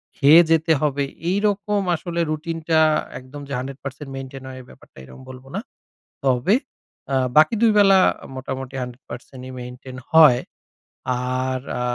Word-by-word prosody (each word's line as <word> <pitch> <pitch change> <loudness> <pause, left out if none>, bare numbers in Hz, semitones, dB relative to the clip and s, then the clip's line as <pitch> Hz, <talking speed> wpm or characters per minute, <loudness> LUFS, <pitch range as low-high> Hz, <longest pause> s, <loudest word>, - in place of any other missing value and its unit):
খেয়ে 150 +4 +7
যেতে 160 0 +3
হবে, 145 -1 0 0.3
এইরকম 205 +1 0
আসলে 170 +1 -5
রুটিন 165 +2 -3
টা 160 -1 +4 0.4
একদম 130 +3 -11
যে, 140 - -6
100% 135 +2 -7
maintain 135 0 -8
হয়, 130 0 -9
এই - - -16
ব্যাপারটা - - -19
এরকম 65 0 -13
বলবো 130 0 -11
না। - - -1 0.7
তবে 130 - +2 0.6
আ - - +2 0.2
বাকি 155 +8 +6
২ 230 -2 +5
বেলা 195 -1 +6 0.3
আ - - -9
মোটামুটি 130 0 -6
100% 125 +1 -11
ই - - -8
maintain 125 +1 -9 0.2
হয়। 155 -6 +7 1.0
আর 130 0 -2 0.2
আ - - -3
140 Hz, 150 wpm, -22 LUFS, 130-165 Hz, 1.0 s, খেয়ে